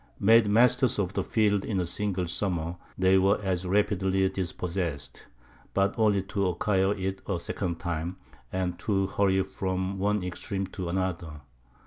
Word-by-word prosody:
Made 110 +1 +5
masters 125 +4 +4
of 95 -2 -1
the - - 0
field 105 -3 +1
in 100 -4 -1
a 90 - 0
single 95 +1 -1
summer, 85 -1 -2 0.2
they 95 +1 +4
were 95 +2 +3
as 95 -2 -2
rapidly 95 -1 +2
dispossessed; 90 -4 -4 0.5
but 100 0 +2
only 105 -4 +2
to 100 0 -1
acquire 95 +2 +1
it 95 0 -3
a 95 -4 -1
second 85 0 -3
time, 85 +1 -3 0.3
and 90 -2 -2
to 95 -2 0
hurry 95 0 +2
from 95 0 -3
one 105 0 +1
extreme 95 +2 -3
to 95 -2 -6
another. 85 -4 -3
95 Hz, 150 wpm, -28 LUFS, 90-100 Hz, 0.5 s, Made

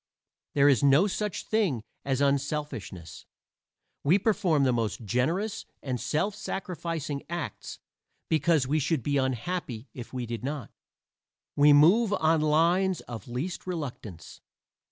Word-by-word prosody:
There 140 0 +5
is 135 -5 +4
no 140 +6 +5
such 210 0 -3
thing 190 - 0 0.2
as 135 0 -1
unselfishness. 140 - -2 0.8
We 165 +7 +5
perform 195 -8 +2
the 130 -2 +3
most 115 -1 -2
"generous" 165 - -1 0.2
and 130 -3 -3
"self 155 - 0
sacrificing" 170 -7 -4
acts 170 -3 -5 0.5
because 160 -3 +2
we 150 +4 +1
should 150 -2 0
be 145 -1 +1
unhappy 130 -1 -2
if 120 -2 -9
we 125 -2 -4
did 115 0 -5
not. 140 -3 -4 0.8
We 145 +1 +6
move 190 +10 +5
on 160 -4 +2
lines 170 +5 +2
of 120 +2 -9
least 140 +11 -4
reluctance. 125 - -6
145 Hz, 130 wpm, -28 LUFS, 125-175 Hz, 0.8 s, We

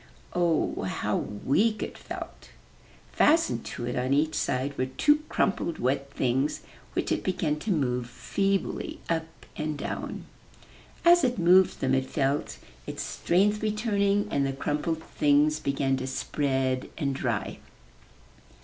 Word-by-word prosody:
Oh, 170 -3 +1
how - - -1
weak 200 - 0
it - - -6
felt! - - -8 0.6
Fastened 325 +2 +3
to 120 - -5
it 120 - -3
on 130 +2 +1
each 155 +2 +2
side 135 +3 -1
were 130 - -1
two 295 - +3
crumpled 195 -5 0
wet 135 +2 0
things, 130 +3 0 0.3
which - - -1
it - - 0
began 155 -5 0
to 205 - -5
move 125 - 0
feebly 195 +9 -1
up 165 0 -3
and 155 -1 -3
down. - - -5 0.8
As 345 -1 +7
it 250 -2 +1
moved 180 +2 +5
them 130 0 +1
it 130 0 +1
felt 140 0 -1 0.3
its - - -4
strength 205 +4 +1
returning 205 -2 +1
and 140 - +1
the 135 0 0
crumpled 150 +4 -2
things 150 +1 +2
began 135 -1 0
to 130 0 -4
spread 130 -1 -1
and 140 -4 0
dry. 120 -6 -2
150 Hz, 140 wpm, -27 LUFS, 135-190 Hz, 0.8 s, As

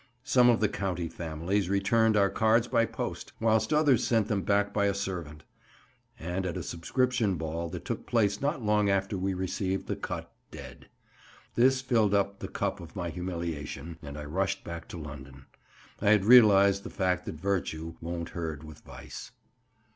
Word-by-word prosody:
Some 125 -3 +5
of 115 -2 +3
the 105 - +4
county 95 -4 -3
families 85 +4 -2
returned 105 +3 +3
our 100 -1 +3
cards 115 +1 +3
by 115 -1 +2
post, - - -5
whilst 110 +2 +2
others 150 -5 +4
sent 110 -3 +1
them 105 -3 +1
back 100 +1 +1
by 100 - +2
a 100 - 0
servant; 85 -6 -5 0.8
and 90 +3 -3
at 85 - -3
a - - -4
subscription 115 +4 0
ball 80 +1 -4
that 90 0 -7
took - - -4
place 105 -4 +1
not 145 -2 -1
long 105 -1 +2
after 100 +1 0
we 95 0 -1
received 95 +1 -2
the - - -2
cut - - -6 0.2
dead. - - -11 0.7
This 130 +2 +3
filled 110 -6 +2
up 100 0 0
the 95 - -5
cup 100 0 -2
of 85 -2 -11
my 90 -3 -3
humiliation, 85 -2 -5
and 70 -1 -8
I 75 - -6
rushed 95 +6 -1
back 85 -1 -7
to - - -8
London. 70 -4 -10 0.6
I - - +3
had 105 -2 +4
realised 100 -4 +7
the - - -7
fact 90 -2 -1
that - - -4
virtue 85 -2 -2
won't 85 0 -4
herd 80 -3 -5
with 75 -1 -11
vice. - - -10
95 Hz, 175 wpm, -29 LUFS, 85-105 Hz, 0.8 s, realised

